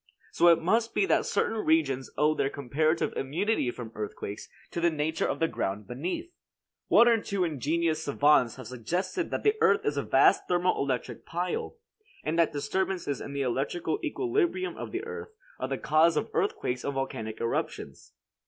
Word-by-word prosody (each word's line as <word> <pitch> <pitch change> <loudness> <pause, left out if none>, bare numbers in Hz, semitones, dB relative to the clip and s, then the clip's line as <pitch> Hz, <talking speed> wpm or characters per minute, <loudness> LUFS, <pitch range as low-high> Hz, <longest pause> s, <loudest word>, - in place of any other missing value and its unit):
So 175 - +4
it 170 -1 +7
must 225 +7 +1
be - - +3
that - - +2
certain 225 - 0
regions 140 -5 +1
owe 150 +1 +4
their 135 - 0
comparative 155 +5 0
immunity 165 - 0
from 120 -2 -7
earthquakes 105 -1 -6 0.2
to 170 - -3
the 170 - +4
nature 160 0 -1
of - - -1
the 165 - +2
ground 100 -7 -3
beneath. 180 - -4 0.5
One 235 - +6
or 230 -2 +4
two 200 -3 -1
ingenious 160 +1 0
savants 140 -4 +3
have 130 - -9
suggested 175 - -2
that - - -3
the 425 - +4
earth 200 - +4
is 145 0 0
a - - +2
vast 135 0 +4
thermo 180 0 +2
electric 130 -3 -2
pile, 175 - -3 0.5
and 160 +2 -1
that 165 - +4
disturbances 175 0 -2
in 140 - -6
the 140 -1 -1
electrical 140 +6 -1
equilibrium 370 +2 0
of - - -7
the 375 +4 -4
earth 455 -1 -7 0.2
are - - -2
the - - -2
cause 155 +1 +3
of - - -2
earthquakes 125 0 -1
and 140 - -3
volcanic 110 -5 -4
eruptions. 115 - -4
160 Hz, 175 wpm, -28 LUFS, 135-190 Hz, 0.5 s, it